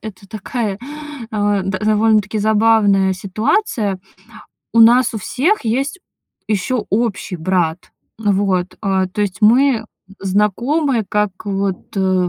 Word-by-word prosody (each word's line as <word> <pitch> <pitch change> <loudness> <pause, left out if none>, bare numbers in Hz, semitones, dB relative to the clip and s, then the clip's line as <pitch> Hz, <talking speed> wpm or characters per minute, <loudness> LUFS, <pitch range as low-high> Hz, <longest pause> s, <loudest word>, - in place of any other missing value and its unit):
это 195 -2 -10
такая, 215 0 -4 0.5
э, 205 -2 0
да 190 0 -2
довольно-таки 215 -1 +2
забавная 210 -2 +3
ситуация. 210 - -1 0.7
У 230 - +4
нас 240 +1 +5
у - - -2
всех 285 - 0
есть 270 - -1 0.5
ещё 215 +3 -1
общий 210 -3 -1
брат. 175 0 -1 0.3
Вот, 195 -3 0
а, 190 -2 0
то 185 +3 -6
есть 205 0 -1
мы, 250 +5 +5
м, 220 0 -8 0.3
знакомы 225 - 0
как 210 -1 +1
вот, 195 -1 -3
э, 185 -2 +1
210 Hz, 120 wpm, -18 LUFS, 195-225 Hz, 0.7 s, нас